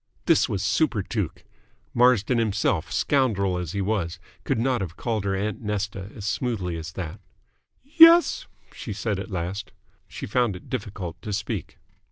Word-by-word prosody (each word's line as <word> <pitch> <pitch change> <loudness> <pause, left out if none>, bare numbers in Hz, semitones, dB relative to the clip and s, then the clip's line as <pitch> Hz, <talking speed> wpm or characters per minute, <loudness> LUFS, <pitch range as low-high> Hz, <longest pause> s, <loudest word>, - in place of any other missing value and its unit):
This - - +4
was 100 -1 -2
superTuke. 105 - 0 0.5
Marsden 125 -1 +4
himself, 95 -6 0
scoundrel 100 - +1
as 90 -2 -5
he 100 - -1
was, 95 -4 -1 0.3
could 135 - +1
not 125 0 +1
have 90 -2 -5
called 110 -4 -2
her 95 -1 0
"Aunt 100 +1 -2
Nesta" 105 -2 -3
as 100 - -7
smoothly 105 -6 -1
as 80 0 -6
that. 85 -4 -6 0.6
"Yes?" 330 +4 +7 0.3
she 110 - -6
said 100 -1 -2
at 100 - -6
last. 95 +2 -4 0.3
She - - -7
found 120 -2 +1
it 90 - -12
difficult 100 -9 -5
to 105 - -5
speak. 100 -2 -4
100 Hz, 155 wpm, -25 LUFS, 95-120 Hz, 0.6 s, Yes